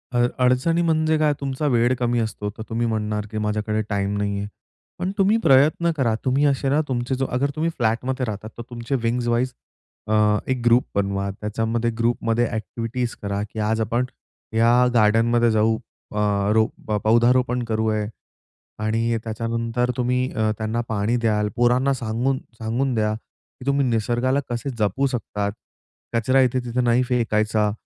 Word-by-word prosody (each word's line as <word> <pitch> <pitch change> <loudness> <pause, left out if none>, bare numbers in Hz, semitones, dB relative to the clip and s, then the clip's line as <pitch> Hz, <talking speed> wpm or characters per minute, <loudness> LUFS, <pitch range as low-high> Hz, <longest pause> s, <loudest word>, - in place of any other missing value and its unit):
अड 120 0 +4 0.2
अडचणी 130 +7 +3
म्हणजे 160 -1 +2
काय 155 -1 +3
तुमचा 140 +1 -2
वेळ 120 +1 +3
कमी 120 -1 +1
असतो, 105 -2 -3
तर 110 - -5
तुम्ही 115 +1 0
म्हणणार 105 -1 -2
की 110 - -4
माझ्याकडे 105 0 -1
टाईम 100 0 -1
नाहीये. 100 0 -2 0.5
पण 180 +2 -1
तुम्ही 200 +3 +4
प्रयत्न 150 +5 +4
करा 120 -5 +2
तुम्ही 135 +3 +2
असे 140 -1 +1
ना, 145 +3 +3
तुमचे 125 0 -1
जो 135 +1 -1
अगर 140 +2 +1
तुम्ही 160 +2 0
फ्लॅट 115 -1 +1
मध्ये 130 0 -1
राहतात 110 -1 -5
तर - - -5
तुमचे 120 +2 -3
विंग्ज 120 +1 0
वाईज 120 +2 +1 0.6
अ, 110 - 0 0.3
1 130 -2 -1
ग्रुप 120 +1 +5
बनवा. 100 0 0
त्याच्यामध्ये 115 +3 -1
ग्रुपमध्ये 115 0 +1
एक्टिविटीज 115 +3 -3
करा 100 0 -2
की 110 - -6
आज 110 +1 0
आपण 120 +3 0 0.5
या 115 +1 +4 0.2
गार्डनमध्ये 115 +1 +4
जाऊ 110 +1 +2
अ, 110 -2 -10 0.3
रो 110 0 +4 0.4
पौधारोपण 125 +2 +3
करू 110 -1 -1
आहे 105 -1 -1 0.8
आणि 115 +2 +1
त्याच्यानंतर 115 +2 -1
तुम्ही 125 +1 0
अ, 110 -1 +1
त्यांना 110 +2 -1
पाणी 110 +2 0
द्याल, 105 -3 +1
पोरांना 125 +3 +3
सांगून, 125 +2 -1 0.2
सांगून 120 +4 -1
द्या 105 -1 +1
की 115 +3 -17
तुम्ही 140 0 +2
निसर्गाला 120 +4 +1
कसे 120 +3 -3
जपू 105 +6 +1
शकतात? 105 -5 -3 0.6
कचरा 130 +3 +3
इथे-तिथे 125 -1 0
नाही 120 +1 +3
फेकायचा, 110 -3 +1
115 Hz, 155 wpm, -23 LUFS, 110-125 Hz, 0.8 s, ग्रुप